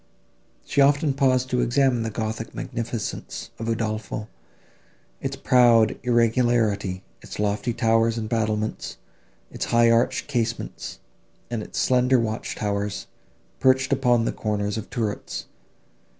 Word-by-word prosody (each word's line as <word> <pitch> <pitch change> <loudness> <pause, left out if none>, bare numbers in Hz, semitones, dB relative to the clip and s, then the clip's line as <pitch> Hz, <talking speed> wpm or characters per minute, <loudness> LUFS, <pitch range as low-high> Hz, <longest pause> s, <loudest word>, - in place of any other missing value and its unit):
She 140 - +2
often 145 +1 +4
paused 130 -2 +2
to 125 -1 +2
examine 125 -1 +2
the 115 - -2
gothic 110 +1 -4
magnificence 115 -1 -5
of 115 - -4
Udolpho, 110 -1 -2 0.9
its 135 0 -3
proud 120 -5 +4
irregularity, 115 -5 +1 0.2
its - - -9
lofty 105 +3 0
towers 115 -1 +2
and 110 -1 -3
battlements, 110 -1 -2 0.5
its - - -3
high 115 0 +4
arched 125 +2 +2
casements, 120 -4 -3 0.5
and 115 -2 -2
its - - -8
slender 125 0 +3
watch 110 -2 -2
towers, 100 -1 -2 0.5
perched 130 +1 +3
upon 125 -3 +3
the - - +1
corners 105 -1 -2
of 110 - -5
turrets. 110 -4 -3
115 Hz, 120 wpm, -24 LUFS, 110-125 Hz, 0.9 s, often